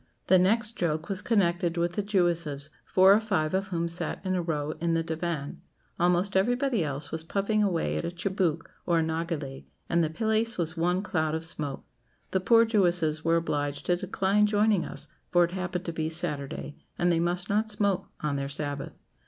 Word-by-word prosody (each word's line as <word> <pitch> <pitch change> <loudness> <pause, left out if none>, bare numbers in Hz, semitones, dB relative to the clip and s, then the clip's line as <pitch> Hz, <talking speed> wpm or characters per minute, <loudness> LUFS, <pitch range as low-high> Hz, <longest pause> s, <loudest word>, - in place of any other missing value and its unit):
The 185 0 +5
next 215 +4 +3
joke 160 0 -1
was 195 0 0
connected 175 -6 +1
with 170 +1 0
the 205 - 0
Jewesses, 170 -7 0
four 190 +1 +6
or 210 - +5
five 185 -8 -1
of 195 +2 0
whom 170 -3 -1
sat 170 +1 -4
in 185 - 0
a 180 - +1
row 155 -3 -2
in 170 -1 +1
the 165 - +1
diwán. 160 -3 -3 0.4
Almost 180 +3 +2
everybody 245 +1 +2
else 145 0 -4
was 160 0 -3
puffing 200 +5 0
away 185 -5 0
at - - -2
a - - -2
tchibouque 175 -2 -1 0.2
or 170 -1 +3
nargileh, 160 -4 -3 0.2
and 170 0 +2
the 155 - 0
place 220 +5 0
was 165 -2 -2
one 180 +3 +1
cloud 160 -6 0
of 160 0 -3
smoke. 150 -4 -4 0.5
The 190 - +2
poor 230 +4 +5
Jewesses 175 -8 +1
were 165 0 +3
obliged 145 -3 -2
to 180 - +3
decline 195 +3 +1
joining 210 -2 +2
us, - - -6 0.2
for 175 0 +4
it 170 - 0
happened 185 -1 -3
to 170 - -3
be 160 -1 -2
Saturday, 150 -3 -4 0.2
and 175 0 +2
they 165 - +2
must 175 +2 0
not 215 +2 +1
smoke 200 -3 +1
on 150 -2 -1
their 140 0 -3
Sabbath. 145 -1 -3
175 Hz, 195 wpm, -28 LUFS, 160-195 Hz, 0.5 s, four